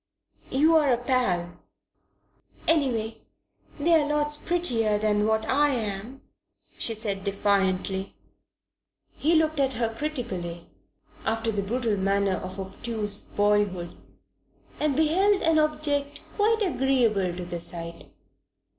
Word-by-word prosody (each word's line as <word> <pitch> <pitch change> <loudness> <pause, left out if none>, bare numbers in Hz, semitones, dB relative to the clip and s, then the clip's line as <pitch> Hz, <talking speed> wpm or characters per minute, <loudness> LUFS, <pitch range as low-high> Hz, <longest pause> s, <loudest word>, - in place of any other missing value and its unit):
You're 300 +1 +4
a 240 - +3
pal." 235 -9 -1 1.1
"Anyway, 235 -8 +1 0.6
they're 315 -1 +4
lots 295 0 +1
prettier 245 -11 0
than 210 0 +1
what 220 0 +1
I 290 +2 +3
am," 225 0 -4 0.5
she 225 - +1
said 205 -3 -3
defiantly. 195 -1 0 1.0
He 325 +3 +2
looked 315 -1 +2
at 270 -1 +2
her 225 -1 -1
critically, 205 - -4 0.6
after 225 0 -1
the 205 -2 -1
brutal 225 +1 -1
manner 195 0 +1
of 185 +1 -7
obtuse 205 +1 -1
boyhood, 205 -4 0 0.8
and 300 -2 +1
beheld 375 +7 +3
an 325 -1 +4
object 295 -2 -1
quite 440 +1 +2
agreeable 240 - +1
to 180 - -5
the 175 0 -5
sight. 170 0 -8
225 Hz, 110 wpm, -26 LUFS, 200-295 Hz, 1.1 s, You're